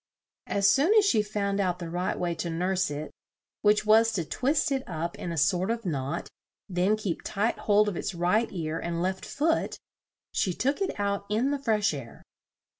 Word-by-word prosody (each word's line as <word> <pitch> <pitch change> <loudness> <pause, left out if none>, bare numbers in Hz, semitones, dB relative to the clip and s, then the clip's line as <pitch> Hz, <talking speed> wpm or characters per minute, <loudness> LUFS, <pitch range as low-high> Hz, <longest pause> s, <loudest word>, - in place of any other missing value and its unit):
As 200 -1 +2
soon 295 - +4
as 425 -2 +6
she 230 - +4
found 205 -1 -2
out 180 -3 +1
the 170 - -6
right 175 +2 -2
way 175 -1 -1
to 170 +1 -4
nurse 180 +2 0
it, 150 +1 -5 0.5
(which 210 0 +3
was 225 +1 +5
to 170 -5 -1
twist 280 - 0
it 270 -1 +1
up 170 0 -4
in 175 - -4
a 165 - -4
sort 180 +5 +2
of 230 -1 -2
knot, 145 -1 -2 0.4
then 190 +3 +1
keep 200 -6 -3
tight 210 +4 -1
hold 210 0 +3
of 205 - -1
its 175 - -3
right 180 +7 +1
ear 165 -3 -3
and 170 0 -3
left 185 +1 -2
foot), 320 +3 0 0.5
she 185 - 0
took 275 - -1
it 385 - -2
out 200 0 -1
in 230 +7 +1
the 285 - -1
fresh 215 - +1
air. 130 -5 -8
195 Hz, 195 wpm, -27 LUFS, 170-220 Hz, 0.5 s, as